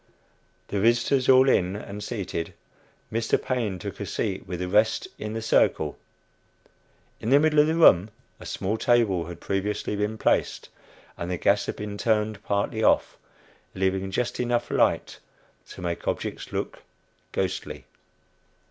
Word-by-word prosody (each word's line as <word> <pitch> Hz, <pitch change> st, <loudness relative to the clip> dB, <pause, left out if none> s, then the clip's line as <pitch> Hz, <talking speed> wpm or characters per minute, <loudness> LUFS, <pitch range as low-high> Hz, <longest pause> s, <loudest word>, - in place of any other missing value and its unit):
The 100 Hz, -, -1 dB
visitors 120 Hz, +5 st, +2 dB
all 130 Hz, 0 st, +7 dB
in 95 Hz, -7 st, +2 dB
and 105 Hz, 0 st, -7 dB
seated, 95 Hz, -7 st, -4 dB, 0.6 s
Mr. 115 Hz, 0 st, +1 dB
Paine 115 Hz, -7 st, -2 dB
took 100 Hz, +2 st, -7 dB
a 100 Hz, -, -3 dB
seat 95 Hz, -1 st, -3 dB
with 90 Hz, -1 st, -4 dB
the 90 Hz, -, -2 dB
rest 105 Hz, +4 st, +2 dB
in 105 Hz, 0 st, -4 dB
the 115 Hz, 0 st, -4 dB
"circle." 110 Hz, -, +2 dB, 1.2 s
In 110 Hz, -, -3 dB
the 140 Hz, +2 st, +6 dB
middle 155 Hz, 0 st, +3 dB
of 150 Hz, -, +6 dB
the 160 Hz, -, +1 dB
room 105 Hz, -, +6 dB, 0.3 s
a -, -, -9 dB
small 105 Hz, +4 st, -2 dB
table 105 Hz, -9 st, +2 dB
had 85 Hz, -1 st, -8 dB
previously 100 Hz, +2 st, -2 dB
been 105 Hz, +2 st, -2 dB
placed, -, -, 0 dB, 0.5 s
and 85 Hz, -, -4 dB
the 90 Hz, -, -1 dB
gas 100 Hz, +3 st, +2 dB
had -, -, -3 dB
been 105 Hz, -1 st, -6 dB
turned 110 Hz, -3 st, 0 dB
partly 100 Hz, +2 st, -1 dB
off, -, -, +3 dB, 0.6 s
leaving 95 Hz, 0 st, 0 dB
just 120 Hz, +5 st, -2 dB
enough 120 Hz, -1 st, 0 dB
light -, -, +1 dB, 0.5 s
to -, -, -9 dB
make 85 Hz, -1 st, -4 dB
objects -, -, -3 dB
look -, -, -4 dB, 0.5 s
ghostly. -, -, -3 dB
105 Hz, 150 wpm, -26 LUFS, 95-120 Hz, 1.2 s, all